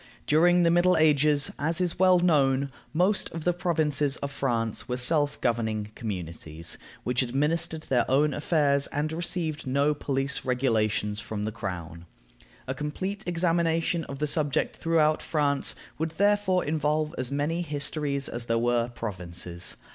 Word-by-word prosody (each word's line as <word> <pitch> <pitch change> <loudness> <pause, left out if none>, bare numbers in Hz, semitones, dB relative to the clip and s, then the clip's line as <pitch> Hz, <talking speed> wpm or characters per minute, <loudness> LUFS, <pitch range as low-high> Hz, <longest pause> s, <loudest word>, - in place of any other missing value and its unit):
During 175 +3 +4
the 170 - +4
Middle 175 +1 +4
Ages, 150 -1 +3
as 160 +4 0
is 180 -1 0
well 185 -1 +6
known, 140 -6 +2 0.2
most 185 +5 +1
of 165 -1 -5
the 175 - +2
provinces 150 -5 0
of 140 - -4
France 115 -5 -2
were 125 - -1
self 145 +3 +1
governing 110 -3 -1
communities, 85 -6 -6 0.2
which 125 +1 +1
administered 155 +6 0
their 125 -5 +1
own 145 +3 +3
affairs, 145 -2 +2
and 150 +2 -2
received 160 -3 -3
no 140 +3 +2
police 140 -1 -2
regulations 110 -5 0
from 110 -2 -4
the 110 - -2
crown. 85 -6 -6 0.6
A 130 - -1
complete 185 +9 -4
examination 165 -1 +1
of 140 - -7
the 150 - 0
subject 150 -1 0
throughout 155 -2 +2
France 145 -3 0 0.2
would 160 +1 0
therefore 205 -2 +2
involve 150 0 0
as 130 -1 -2
many 150 +5 -1
histories 145 -2 -2
as 120 0 -5
there 115 -1 +1
were 120 0 +1
provinces. 90 -5 -6
145 Hz, 145 wpm, -27 LUFS, 120-165 Hz, 0.6 s, well